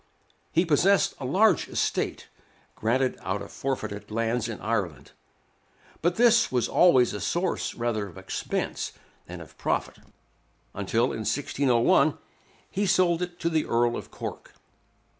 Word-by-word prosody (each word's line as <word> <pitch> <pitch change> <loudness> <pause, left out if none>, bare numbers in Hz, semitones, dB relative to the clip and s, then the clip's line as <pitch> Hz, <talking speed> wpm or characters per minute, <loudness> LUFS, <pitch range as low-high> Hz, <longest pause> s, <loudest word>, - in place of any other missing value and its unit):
He 170 +3 +2
possessed 180 +5 +3
a 135 - -5
large 190 +7 +3
estate, - - -2 0.5
granted 125 +4 0
out 100 +2 -3
of 100 - -11
forfeited 110 -6 -4
lands 115 +1 -1
in 110 - -6
Ireland; 100 - -3 0.9
but 175 +2 +1
this 235 -1 +4
was 125 -2 +1
always 130 -11 +4
a 105 - -5
source 175 +1 -1
rather 115 -4 -2
of 90 - -13
expense - - -3 0.3
than - - -8
of - - -13
profit, - - -1 0.8
until, 115 +5 0
in - - -4
1601, 130 +1 +2 0.5
he 200 +1 0
sold 175 -2 +3
it 175 -1 -5
to 170 - +1
the 160 -1 0
Earl 120 0 +2
of - - -7
Cork. - - -8
125 Hz, 140 wpm, -26 LUFS, 110-175 Hz, 0.9 s, this